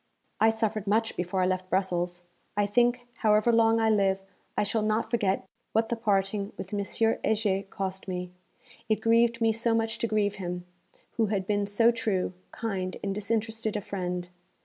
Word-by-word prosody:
'I 220 - +6
suffered 220 -2 -1
much 220 +2 +1
before 180 +1 0
I - - +3
left 185 0 -1
Brussels. 175 -2 0 0.3
I 205 - +3
think, 240 +4 +3 0.2
however 215 +1 +4
long 225 0 +4
I 220 -1 +3
live, 195 -2 +3 0.4
I - - +3
shall 215 +2 0
not 215 +1 0
forget 200 -5 +1 0.3
what 225 +1 +2
the 235 - +1
parting 200 -2 0
with 190 - -7
M. 205 - 0
Heger 215 -2 +1
cost 190 0 -4
me: 180 -1 -4 0.6
it 215 - +5
grieved 230 +1 +3
me 225 -1 +4
so 230 +1 +1
much 225 0 -1
to 230 - 0
grieve 210 -2 +1
him, 180 0 -4 0.5
who 225 -2 +3
had 195 -2 -1
been 205 0 0
so 225 +3 +4
true, 210 -6 -1 0.2
kind 190 -5 -3
and 200 -1 -1
disinterested 220 +1 -1
a - - -3
friend. 180 -2 -4
210 Hz, 175 wpm, -28 LUFS, 190-225 Hz, 0.6 s, I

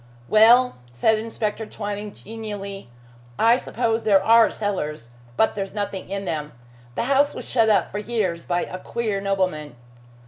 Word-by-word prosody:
"Well," 235 - +5 0.2
said 215 - +3
Inspector 220 -1 -3
Twining 205 -1 -5
genially, 205 - -7 0.5
"I 230 +1 +5
suppose 230 -2 -1
there 195 -3 +4
are 230 +1 +6
cellars, 150 - -4 0.3
but 220 - +3
there's 195 0 -5
nothing 200 -3 -4
in 195 0 -4
them. 150 -3 -4 0.4
The - - -1
house 275 +3 +2
was - - -7
shut 225 -3 +2
up 210 - +2
for 205 - -3
years 205 -6 -2
by 175 0 -1
a 185 - -7
queer 215 -1 -3
nobleman." 185 -8 -1
205 Hz, 150 wpm, -23 LUFS, 190-225 Hz, 0.5 s, are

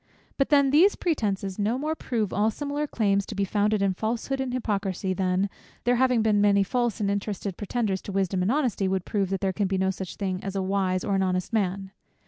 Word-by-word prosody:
But 275 - +1
then 280 -2 +4
these 350 +8 +5
pretences 200 - -1
no 215 +4 +1
more 305 +3 -1
prove 225 -9 -2
all 210 +3 +2
similar 290 +5 -3
claims 200 -6 +1
to 215 - -6
be 200 0 +1
founded 210 +1 +1
in 195 -1 +2
falsehood 230 +7 -2
and 260 -1 -2
hypocrisy, 195 -6 -1
than 185 +1 +1 0.4
there 245 0 +2
having 250 -3 +3
been 210 -2 +3
many 200 -1 +4
false 240 +2 -1
and 200 -2 +1
interested 200 -1 -3
pretenders 205 -2 -2
to - - -7
wisdom 190 -1 0
and 185 +5 +1
honesty, 250 -9 +1
would 190 -1 -1
prove 200 -3 -1
that 195 0 -2
there 190 -1 0
can 200 +1 0
be 190 0 -1
no 190 0 +1
such 190 -1 -6
thing 185 -2 -3
as 195 0 -4
a 195 - 0
wise 185 -1 0
or 200 - -1
an 195 - +2
honest 185 +1 -1
man. 195 -2 -1
200 Hz, 225 wpm, -26 LUFS, 190-235 Hz, 0.4 s, these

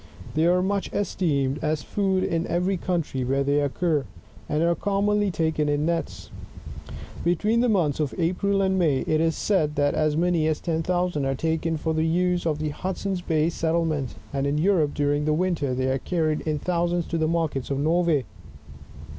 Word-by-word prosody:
They 155 +2 +2
are 180 +1 +3
much 200 +1 -1
esteemed 145 -8 0
as 155 -1 0
food 190 -2 0
in 165 +1 -1
every 180 +3 0
country 170 -7 -2
where 135 +2 +1
they 140 +1 +2
occur, 150 +1 0 0.5
and 150 +2 +1
are 170 0 +3
commonly 205 +2 +1
taken 160 -3 0
in 145 +1 +1
nets. 170 0 -3 0.9
Between 210 +7 +2
the 245 0 +3
months 165 -10 +1
of 150 -3 -1
April 195 +3 +1
and 190 0 +1
May, 150 -7 +2
it 155 0 +1
is 165 -1 +1
said, 155 -8 +1
that 145 0 +2
as 155 -1 +1
many 170 -2 +2
as 155 -1 0
ten 165 -2 -1
thousand 175 -4 0
are 135 0 0
taken 160 +2 -1
for 160 +1 -2
the 160 +1 +1
use 175 +1 +1
of 155 -2 0
the 155 0 -2
Hud 180 +5 -4
son's 195 -3 -2
Bay 160 -1 +1
settlement; 160 -5 -1 0.2
and 140 0 0
in 145 +1 0
Europe, 160 -3 +2
during 145 0 +1
the 155 - +2
winter, 155 -6 0
they 130 +1 -1
are 135 - 0
carried 155 -1 -1
in 155 -1 0
thousands 175 +1 0
to4he 160 -2 -1
markets 160 -6 -1
of 140 - -1
Norway. 160 -2 +2
160 Hz, 190 wpm, -25 LUFS, 150-180 Hz, 0.9 s, are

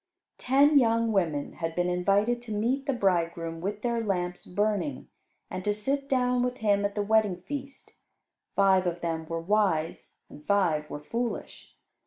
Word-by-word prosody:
Ten 280 +3 +5
young 230 -2 +2
women 165 -8 0
had 165 -1 -4
been 175 0 +1
invited 200 +7 +1
to 240 -2 -9
meet 245 +7 -1
the - - +2
bridegroom 170 -6 0
with 205 +3 -4
their 235 -1 0
lamps 180 -3 -2
burning 210 +8 -1 0.4
and 185 - -6
to 205 +1 0
sit 275 +6 -2
down 250 -2 +2
with 250 0 -1
him 205 -3 +2
at 200 - -2
the 205 - 0
wedding 205 -4 +2
feast. 280 +4 -7 0.6
Five 190 -2 +4
of 175 0 -3
them 160 -1 -3
were 165 0 -3
wise 180 -3 0
and 150 - -13
five 160 -5 +1
were 145 - -7
foolish. 235 +7 -5
205 Hz, 165 wpm, -28 LUFS, 175-235 Hz, 0.6 s, Ten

